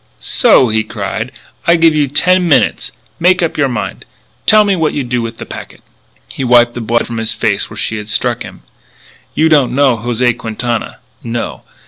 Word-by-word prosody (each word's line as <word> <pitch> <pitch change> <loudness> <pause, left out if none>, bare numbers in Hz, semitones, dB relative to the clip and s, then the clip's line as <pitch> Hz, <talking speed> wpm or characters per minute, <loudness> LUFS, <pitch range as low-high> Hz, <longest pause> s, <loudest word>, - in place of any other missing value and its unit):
"So," 125 - +3
he 110 0 +1
cried, 110 +2 -5 0.4
"I 170 - +6
give 165 -1 +4
you 150 -2 +1
ten 180 +6 +2
minutes, 150 - +1 0.3
make 180 +1 +3
up 165 - -1
your 140 -2 +1
mind, 120 -5 -4 0.4
tell 215 0 +6
me 200 -2 +1
what 160 -3 0
you 145 - -2
do 125 -1 -2
with 115 0 -6
that - - -7
packet." - - -10 0.4
He - - -6
wiped 120 -1 +4
the 120 - -5
blood 115 +1 0
from 115 - -6
his 110 0 0
face - - -1
where - - -10
she 115 - -2
had 105 0 -7
struck 100 - 0
him. - - -10 0.7
"You 160 - +3
don't 145 -6 +3
know 135 -4 +3
José 120 +1 0
Quintana. 115 +1 -4 0.3
No! 115 0 -4
125 Hz, 190 wpm, -14 LUFS, 115-155 Hz, 0.7 s, I